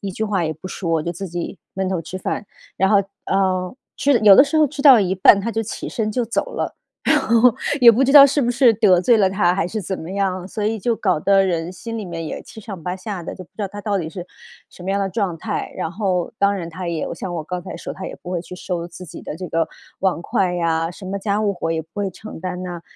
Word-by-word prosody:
一 200 - -4
句 220 - -4
话 195 -5 0
也 155 - -1
不 185 +5 -9
说， 165 -4 -1
就 170 - -3
自 195 +3 -6
己 175 +2 -5 0.2
闷 190 0 -1
头 185 -3 -1
吃 185 +4 -7
饭， 195 - -3 0.3
然 190 - +2
后， 205 - +6 0.3
呃， 185 -1 0 0.2
吃 280 -2 +3
有 205 -3 +8
的 270 - +9
时 295 +2 -2
候 305 - +5
吃 285 0 -6
到 270 -6 +8
一 190 -1 0
半， 195 +1 +6
她 230 - -2
就 225 0 -1
起 225 - -6
身 215 -2 -2
就 245 0 0
走 360 - -2
了， - - -3 0.3
然 305 - +4
后， 235 -1 +4 0.3
也 235 -1 +10
不 245 +4 +3
知 275 - +2
道 285 -2 +11
是 280 +1 +1
不 240 - +1
是 245 -1 +5
得 195 -5 +4
罪 235 +5 +4
了 195 -3 +4
她 185 -2 +2
还 170 -3 0
是 215 +4 -4
怎 190 +1 -4
么 160 - -8
样， 185 -2 -1
所 210 +2 -5
以 220 +1 0
就 235 +4 0
搞 185 -7 +1
得 195 +3 +4
人 170 -2 -1
心 230 +5 -7
里 215 - -5
面 165 -2 -5
也 - - -5
七 220 - -12
上 195 -5 -8
八 180 +1 -3
下 190 -1 -6
的， - - -6
就 185 - -9
不 - - -28
知 215 - -4
道 - - 0
她 205 +1 -8
到 205 -1 -1
底 165 -3 -3
是 175 +1 -7 0.5
什 - - -13
么 190 - -2
样 200 - +1
的 195 - 0
状 190 -3 -2
态。 - - -4
然 160 - -3
后， 185 -3 -1
当 200 0 +3
然 175 -4 -5
她 180 +2 -6
也 165 -2 -2
像 175 +1 -5
我 160 - -3
刚 180 +2 -4
才 - - -8
说 - - -6
她 190 -1 -7
也 - - -6
不 180 - -7
会 175 -2 -1
去 180 - -10
收 175 -1 -4
自 175 +1 -11
己 - - -10
的 - - -6
这 180 +1 -6
个 165 +1 0 0.3
碗 190 -3 +1
筷 180 +1 0
呀， 165 -1 0
什 190 +2 -10
么 200 +1 -3
家 200 +1 -1
务 205 -2 +1
活 165 -2 -2
也 160 - -1
不 160 - -27
会 205 -2 -2
承 210 +4 -10
担 180 0 -4
呐。 175 -2 -6
190 Hz, 300 characters per minute, -21 LUFS, 175-215 Hz, 0.5 s, 道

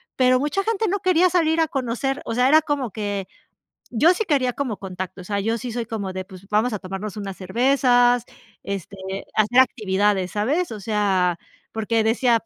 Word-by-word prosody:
pero, 255 0 +4
mucha 295 +8 -1
gente 445 0 0
no 405 +2 0
quería 365 -1 +3
salir 330 -2 +2
a 325 - +3
conocer. 270 0 -2
O - - -3
sea, 250 +2 +3
era 310 +3 +6
como 285 -5 -1
que, 205 -2 -3 0.6
yo 310 +10 +4
sí 440 - -1
quería 265 -7 +1
como 255 -7 -3
contacto. 185 0 -6
O - - -13
sea, 200 +2 -2
yo 225 +3 -1
sí 245 0 -5
soy 240 0 -2
como 205 -4 -4
de, 185 0 -4
pues, 190 0 -14
vamos 215 +4 +1
a 210 - -2
tomarnos 195 +2 -6
unas 195 -2 -5
cervezas, 245 +3 +3 0.4
este 200 0 -6 0.4
hacer 215 +3 +2
actividades, 200 -6 +1
¿sabes?, 265 - 0
o 215 - -7
sea, 195 -4 +1 0.4
porque 225 +1 0
decía: 230 +1 +2
230 Hz, 190 wpm, -22 LUFS, 200-270 Hz, 0.6 s, era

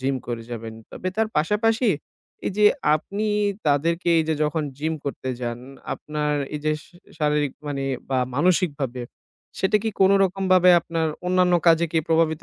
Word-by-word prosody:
Gym 135 +1 0
করে 120 -1 -4
যাবেন। 115 -1 -6 0.2
তবে 185 - -4
তার 220 0 +1
পাশাপাশি, 220 +8 +2 0.6
এই - - 0
যে 210 - +3 0.3
আপনি 200 +7 -3 0.4
তাদেরকে 165 +4 +1
এই 160 - +2
যে 160 - +2
যখন 150 +1 0 0.2
জিম 160 +2 -1
করতে 135 -2 -4
যান 120 -1 -3 0.4
আপনার 150 0 -3 0.2
এই 150 - -3
যে 155 - +2
শ - - -19 0.3
শারীরিক 150 -2 +1 0.2
মানে 140 -1 -3 0.3
বা 130 - +2 0.2
মানসিকভাবে, 145 -6 0 0.6
সেটা 190 +2 +3
কি 225 - 0
কোন 190 0 +6
রকমভাবে 185 -1 +4
আপনার 165 -1 -2 0.2
অন্যান্য 180 -1 +3
কাজে 165 0 +5
কি 165 - +3
প্রভাবিত 160 -1 +2
160 Hz, 160 wpm, -23 LUFS, 145-185 Hz, 0.6 s, কোন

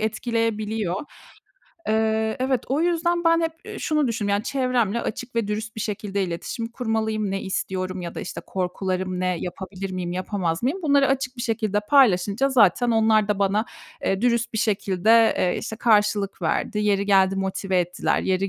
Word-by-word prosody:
etkileyebiliyor. 220 -3 -1 0.9
Eee, 220 0 +1
evet, 260 -2 +1
o 280 +4 +1
yüzden, 345 0 +1
ben 330 0 +4
hep, 325 -1 0 0.2
ııı, - - -7
şunu 305 -3 +1
düşündüm: 215 -3 -2
Yani 200 +1 +1
çevremle 250 -5 0
açık 245 +2 -5
ve 225 -3 0
dürüst 215 +1 -4
bir - - -4
şekilde 200 -1 -2
iletişim 185 +6 -4
kurmalıyım, 220 -4 -1
ne 195 0 -2
istiyorum 185 -1 -3
ya 170 -1 -6
da, - - -4
işte, - - -6
korkularım 185 0 -2
ne 185 -1 0
yapabilir 190 +2 -6
miyim 175 -1 -3
yapamaz 185 -1 -2
mıyım 320 +10 -1
bunları 280 -3 +4
açık 265 -1 -1
bir 240 - -4
şekilde 215 -3 0
paylaşınca 210 0 +3
zaten 240 -1 +4
onlar 220 -2 +3
da 205 -1 0
bana, 200 +2 +1 0.4
eee, 195 +2 0
dürüst 235 -1 +1
bir 220 - -2
şekilde, 215 +2 +3
eee, 180 - +1
işte, 220 - -5
karşılık 210 -4 +2
verdi. 190 +6 -1
Yeri 200 -1 +1
geldi 195 -1 +4
motive 190 0 -1
ettiler, 175 +1 0
yeri 190 +1 0
215 Hz, 170 wpm, -23 LUFS, 190-235 Hz, 0.9 s, ben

